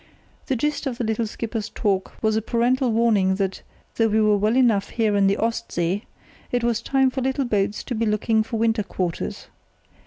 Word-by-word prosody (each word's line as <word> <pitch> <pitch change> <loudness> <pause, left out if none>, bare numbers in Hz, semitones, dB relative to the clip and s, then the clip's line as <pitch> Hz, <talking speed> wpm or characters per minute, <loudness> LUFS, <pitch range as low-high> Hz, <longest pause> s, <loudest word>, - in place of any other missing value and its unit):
The 265 - +1
gist 295 +3 -1
of 250 -3 -3
the 245 - -2
little 220 0 -1
skipper's 225 0 -4
talk 195 -3 -1
was 220 0 +2
a 220 - +1
parental 245 +3 +1
warning 215 -4 +3
that, 195 -1 -2 0.4
though 225 - +4
we 220 0 +2
were 215 -1 +4
well 210 +4 +1
enough 225 -6 +3
here 220 -3 +1
in 200 -1 +4
the 195 - +2
"Ost 230 +1 -2
See", 175 +5 -1 0.5
it 245 -1 0
was 235 -1 +1
time 265 +1 +2
for 265 - -3
little 265 +1 0
boats 205 -3 0
to 255 - -4
be 225 -1 0
looking 220 +1 +2
for 225 +1 -3
winter 225 0 +2
quarters. 180 -4 -4
225 Hz, 205 wpm, -23 LUFS, 205-240 Hz, 0.5 s, though